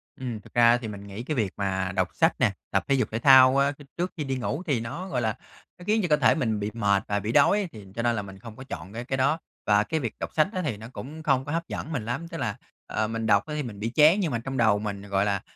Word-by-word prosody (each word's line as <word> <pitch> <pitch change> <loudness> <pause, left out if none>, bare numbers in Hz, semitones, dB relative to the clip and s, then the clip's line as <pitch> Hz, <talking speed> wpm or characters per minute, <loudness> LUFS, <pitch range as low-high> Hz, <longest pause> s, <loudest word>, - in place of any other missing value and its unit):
Ừm, 120 -5 -5
thực - - -18
ra 120 0 +6
thì 120 -2 -6
mình 100 -2 -7
nghĩ 100 +4 -7
cái 150 +4 -3
việc 105 -7 -1
mà 95 -2 -1
đọc 95 -1 +2
sách - - +3
nè, - - +3 0.2
tập - - +1
thể 140 - +3
dục 130 - 0
thể 110 - -2
thao, 130 +1 +7
a, 140 +1 +3
khi 145 0 -13
trước 180 +2 -1
khi 155 - -2
đi 135 -2 -2
ngủ 140 +6 -3
thì 140 -8 +1
nó, 115 +12 -5
gọi 125 -9 -1
là, 110 -2 0 0.4
nó 180 - -12
khiến 215 +1 +3
cho 180 - 0
cơ 150 - +4
thể - - +4
mình 110 -9 0
bị 105 +1 -3
mệt 100 -3 +1
và 100 0 0
bị 105 +3 -3
đói 190 - +4
thì 105 -3 -11
cho 115 - -1
nên 120 0 +1
là 105 - -1
mình 95 -1 -11
không 110 +1 -10
có 130 - -9
chọn 95 - -8
cái 120 +2 -5
cái 135 +1 -2
đó. 140 +5 +2 0.3
Và 105 0 +4
cái 160 +8 -2
việc 115 -6 -3
đọc - - -3
sách 155 - +3
á 185 - -1
thì 120 -8 -2
nó 110 +2 -9
cũng 155 +5 -8
không 135 -4 +2
có 145 - -5
hấp 165 +2 -2
dẫn 155 - -5
mình 130 -9 -3
lắm, 135 +9 -3
tức 165 -1 -7
là, 105 -9 -2 0.3
ờ, 110 - -1
mình 115 0 -3
đọc 100 -2 +3
á 155 - -6
thì 150 - -2
mình 110 -5 -8
bị 110 +2 -2
chán 155 +6 +6
nhưng 175 -7 0
mà 115 - -1
trong 135 +3 -5
đầu 110 -4 +4
mình, 100 -2 -4
gọi 100 0 0
là, 100 -2 0
120 Hz, 315 wpm, -26 LUFS, 105-145 Hz, 0.4 s, thao